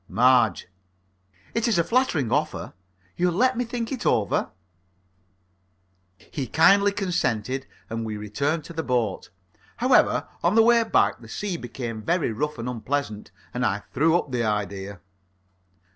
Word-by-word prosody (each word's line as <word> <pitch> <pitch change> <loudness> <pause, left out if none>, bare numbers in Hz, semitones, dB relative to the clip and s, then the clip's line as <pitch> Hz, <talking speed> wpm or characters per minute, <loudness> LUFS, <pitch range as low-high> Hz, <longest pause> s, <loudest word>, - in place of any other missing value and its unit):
MARGE: 120 -5 +3 0.9
It 230 +1 0
is 230 - +2
a 170 - +4
flattering 180 - +1
offer. 150 +3 -1 0.4
You'll 175 -1 +1
let 255 +5 +3
me 245 - 0
think 240 +1 -4
over 105 -3 +1 1.7
it? - - -23
He 135 -4 -3
kindly 200 +6 +5
consented, 130 - -1 0.2
and 115 0 -4
we 110 -1 -4
returned 140 +10 -2
to 170 - -10
the 160 - -2
boat. 120 -9 -1 0.5
However, - - +3 0.2
on 175 +5 +3
the 225 - +7
way 235 0 +5
back - - +2
the 115 - -13
sea 200 - -3
became 120 -5 -6
very 170 +1 0
rough 150 +7 -3
and 115 +1 -5
unpleasant; 125 -2 -3 0.2
and 125 - -2
I 100 -2 0
threw 160 +5 +3
up 150 - -4
the 120 -2 0
idea. 100 -2 -3
140 Hz, 145 wpm, -25 LUFS, 115-180 Hz, 1.7 s, the